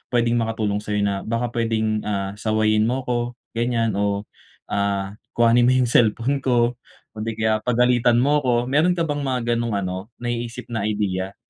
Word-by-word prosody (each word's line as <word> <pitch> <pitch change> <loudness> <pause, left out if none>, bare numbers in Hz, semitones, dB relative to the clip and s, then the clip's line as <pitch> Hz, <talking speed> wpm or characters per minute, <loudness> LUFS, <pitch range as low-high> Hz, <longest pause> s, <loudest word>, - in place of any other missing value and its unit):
pwedeng 120 0 +2
makatulong 110 -2 -1
sa'yo 105 0 -2
na 100 -1 0
baka 115 +1 -1
pwedeng 110 -2 0
ah, 100 -2 -2
sawayin 110 0 +2
mo 130 +2 -1
'ko 120 -1 -2 0.2
ganyan 115 -1 0
o 100 0 0 0.5
ah, 100 -1 -1 0.2
kuhanin 120 +1 +4
mo 130 - +4
yung 125 -2 +2
cellphone 120 +5 +2
ko 120 -2 +1 0.3
kundi 110 +1 -4
kaya 110 0 +1
pagalitan 120 +1 +3
mo 145 +3 +3
'ko. 120 -4 +1
Meron 160 +6 +3
ka 170 - 0
bang 145 -2 -2
mga 130 -2 -1
ganong 115 -2 -1
ano, 95 0 -3 0.2
naiisip 120 0 -4
na 110 -3 -1
idea? 100 -2 -2
115 Hz, 165 wpm, -22 LUFS, 105-120 Hz, 0.5 s, kuhanin